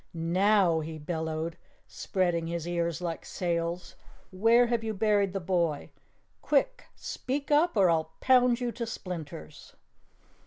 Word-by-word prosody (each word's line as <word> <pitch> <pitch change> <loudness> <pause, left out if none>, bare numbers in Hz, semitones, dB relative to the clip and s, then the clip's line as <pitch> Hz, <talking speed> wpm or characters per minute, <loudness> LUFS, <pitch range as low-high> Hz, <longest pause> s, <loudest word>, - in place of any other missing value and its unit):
"NOW!" 180 +1 +3
he 160 0 -6
bellowed, 160 +1 -4 0.3
spreading 175 -3 -1
his 170 0 -4
ears 170 -1 -1
like 165 -2 -4
sails. 170 0 -3 0.4
"Where 225 +6 +4
have 235 -1 -1
you 220 -1 -3
buried 205 -1 +2
the 195 - -3
boy? 170 -4 -1 0.5
Quick, 480 - +1
speak 280 +3 -4
up 300 -2 +3
or 195 -2 +5
I'll 160 -2 +1
pound 250 -2 +4
you 245 -1 -2
to 235 0 -5
splinters." 165 - -8
180 Hz, 130 wpm, -28 LUFS, 165-225 Hz, 0.5 s, or